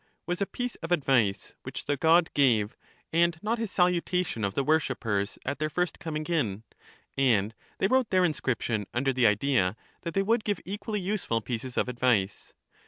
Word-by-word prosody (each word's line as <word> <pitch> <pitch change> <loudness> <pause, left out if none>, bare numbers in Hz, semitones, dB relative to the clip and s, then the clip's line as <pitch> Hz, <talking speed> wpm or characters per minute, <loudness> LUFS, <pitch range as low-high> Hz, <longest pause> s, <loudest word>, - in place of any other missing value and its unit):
" - - -49
was 175 +3 -2
a 200 - +1
piece 245 -1 -4
of 165 +1 -7
advice 130 - +2
which - - -7
the 145 - +1
god 160 +4 +4
gave, 115 -7 +3 0.4
and 170 0 +3
not 225 +2 0
his 225 -2 -2
salutation 180 - +1
of 100 -1 -1
the 140 - +1
wor 155 +3 +4
shippers 105 -9 -2
at 140 - -3
their 155 0 0
first 180 +3 -1
coming 155 -1 -4
in; 115 - -1 0.5
and 115 -6 +2 0.2
they - - +1
wrote 255 +3 +2
their 185 -1 +4
inscription 120 - -1
under 135 +2 +1
the 125 -2 +4
idea 105 -2 +2 0.2
that 170 - -5
they 195 - +3
would 225 +2 +1
give 205 -4 -1
equally 210 +2 -3
useful 185 - -1
pieces 125 +2 -5
of - - +2
advice. 120 -6 0
150 Hz, 185 wpm, -28 LUFS, 115-180 Hz, 0.5 s, god